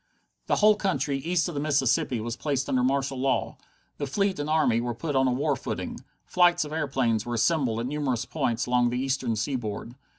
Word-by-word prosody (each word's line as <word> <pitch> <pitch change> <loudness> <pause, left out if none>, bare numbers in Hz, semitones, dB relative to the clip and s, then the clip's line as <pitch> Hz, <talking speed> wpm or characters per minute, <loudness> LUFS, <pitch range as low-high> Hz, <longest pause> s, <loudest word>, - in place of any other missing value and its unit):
The - - +2
whole 215 0 +6
country 185 -9 -1
east 170 +4 0
of 175 - -5
the 145 - -2
Mississippi 135 -4 +1
was 115 +1 -4
placed 140 -2 -2
under 130 - +1
martial 135 0 0
law. 135 +1 0 0.4
The 145 - -2
fleet 195 +4 0
and 145 +1 -3
army 155 -7 +3
were 120 -1 -3
put 145 +4 -3
on 130 0 +3
a - - +2
war 140 +3 +1
footing. 130 - -5 0.3
Flights 175 -2 +3
of 150 - -7
airplanes 130 -8 0
were 120 0 -3
assembled 120 -2 +1
at - - -3
numerous 130 -3 -1
points 120 -7 -1
along 125 -1 +2
the 125 - -2
eastern 130 -3 -1
seaboard. 110 -1 -3
135 Hz, 200 wpm, -26 LUFS, 120-150 Hz, 0.4 s, whole